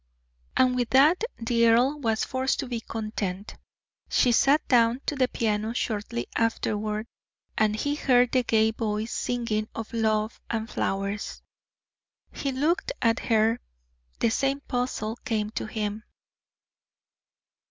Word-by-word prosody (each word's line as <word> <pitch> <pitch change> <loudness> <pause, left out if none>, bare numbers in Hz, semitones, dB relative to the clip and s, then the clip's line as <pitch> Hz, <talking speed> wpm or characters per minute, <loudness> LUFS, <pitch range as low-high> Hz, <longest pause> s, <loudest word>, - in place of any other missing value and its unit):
And 255 -1 +4
with 245 -2 0
that 300 +9 +5
the 235 0 +2
earl 250 +6 +3
was 225 -5 0
forced 260 +1 -1
to 270 - -5
be 240 -2 -3
content. 215 -4 -4 0.6
She 245 - +3
sat 275 +5 +3
down 240 0 +3
to 295 - -1
the 260 -2 +2
piano 220 -1 -1
shortly 210 - -2
afterward, 215 -1 -1 0.5
and 215 -1 +2
he 285 +6 -1
heard 250 -4 +3
the 255 - +3
gay 220 -2 +2
voice 220 0 -2
singing 230 -3 -1
of 225 +1 -6
love 220 -1 0
and 225 -1 -2
flowers. 200 -1 -3 0.9
He 275 - -3
looked 325 - 0
at 230 -1 +2
her 225 0 +2 0.6
the 225 - +2
same 275 +3 0
puzzle 245 -4 -2
came 215 -4 -2
to 220 - -4
him. 215 -1 -3
230 Hz, 130 wpm, -26 LUFS, 215-255 Hz, 0.9 s, that